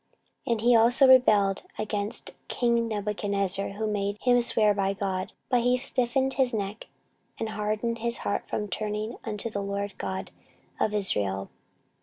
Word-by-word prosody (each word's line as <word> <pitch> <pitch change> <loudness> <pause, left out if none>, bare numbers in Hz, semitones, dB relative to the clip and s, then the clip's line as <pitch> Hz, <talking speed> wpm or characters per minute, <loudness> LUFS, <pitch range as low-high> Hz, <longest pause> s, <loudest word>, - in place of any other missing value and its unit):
14:036:013 - - 0
And 220 - -3
he 240 +1 +5
also 240 +4 +6
rebelled 210 -7 +5
against 210 -1 -3
king 235 -1 +1
Nebuchadnezzar, 200 -2 -1
who 215 +2 -5
had 215 -1 0
made 200 0 -1
him 245 -1 +4
swear 215 -3 +3
by 195 -1 0
God: 190 -2 -3 0.2
but 250 - +3
he 250 +1 +3
stiffened 265 +1 +1
his 260 -3 +1
neck, 205 +1 -4 0.5
and 225 - -3
hardened 215 +2 -2
his 235 +1 -1
heart 200 - -2
from 210 - -2
turning 210 +3 -3
unto 220 +1 -3
the 200 - -3
LORD 200 0 -3
God 190 0 -4 0.5
of 210 - +1
Israel. 100 - -1
210 Hz, 160 wpm, -27 LUFS, 200-235 Hz, 0.5 s, also